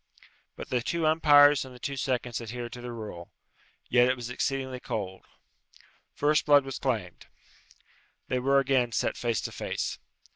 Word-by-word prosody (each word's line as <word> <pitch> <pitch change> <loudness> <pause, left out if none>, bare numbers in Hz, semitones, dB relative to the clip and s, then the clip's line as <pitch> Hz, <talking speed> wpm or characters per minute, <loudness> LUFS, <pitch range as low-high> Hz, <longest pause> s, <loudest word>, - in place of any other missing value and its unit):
But - - -9
the 125 -1 +1
two 165 +6 -1
umpires 145 -2 +6
and 130 -1 -11
the - - -13
two 140 +3 -4
seconds 125 -3 -2
adhered 120 +1 -6
to 125 - -8
the 120 0 -6
rule. 105 -7 -8 0.6
Yet 120 0 +4
it 130 - +2
was 120 -1 -7
exceedingly 130 0 -2
cold. 95 -6 -5 0.9
First 150 +1 +2
blood 145 -2 +6
was 135 - -5
claimed. 105 -10 -3 1.0
They 130 - 0
were 135 +2 +2
again 130 -3 +2
set - - 0
face 115 -4 -1
to - - -5
face. - - -4
125 Hz, 160 wpm, -28 LUFS, 120-140 Hz, 1.0 s, umpires